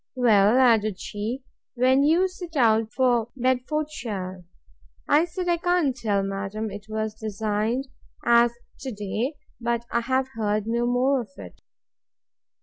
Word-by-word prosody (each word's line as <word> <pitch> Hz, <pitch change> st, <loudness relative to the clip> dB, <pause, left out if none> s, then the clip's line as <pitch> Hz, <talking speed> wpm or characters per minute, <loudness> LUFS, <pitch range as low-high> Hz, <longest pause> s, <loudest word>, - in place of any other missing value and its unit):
Well, 220 Hz, -2 st, +4 dB
added 220 Hz, -6 st, +3 dB
she, 220 Hz, +8 st, -4 dB, 0.3 s
when 260 Hz, +2 st, +4 dB
do 285 Hz, -, +3 dB
you 345 Hz, +5 st, +4 dB
set 360 Hz, -3 st, -10 dB
out 225 Hz, -4 st, +3 dB
for 245 Hz, -4 st, +2 dB
Bedfordshire?—I 230 Hz, -, -2 dB
said, 355 Hz, +2 st, -5 dB
I 345 Hz, -1 st, +2 dB
can't 350 Hz, -6 st, +1 dB
tell, 210 Hz, -5 st, 0 dB
madam; 195 Hz, +2 st, -4 dB
it 205 Hz, +1 st, -9 dB
was 215 Hz, 0 st, -2 dB
designed 220 Hz, +4 st, -2 dB, 0.4 s
as 235 Hz, 0 st, +5 dB, 0.3 s
to 265 Hz, -, -5 dB
day, 215 Hz, +7 st, -3 dB, 0.2 s
but 235 Hz, 0 st, -1 dB
I 235 Hz, -, +2 dB
have 260 Hz, +2 st, 0 dB
heard 215 Hz, -4 st, -1 dB
no 235 Hz, +1 st, 0 dB
more 255 Hz, +2 st, +2 dB
of 220 Hz, -, -10 dB
it. 90 Hz, -3 st, -11 dB
235 Hz, 140 wpm, -25 LUFS, 210-260 Hz, 0.4 s, as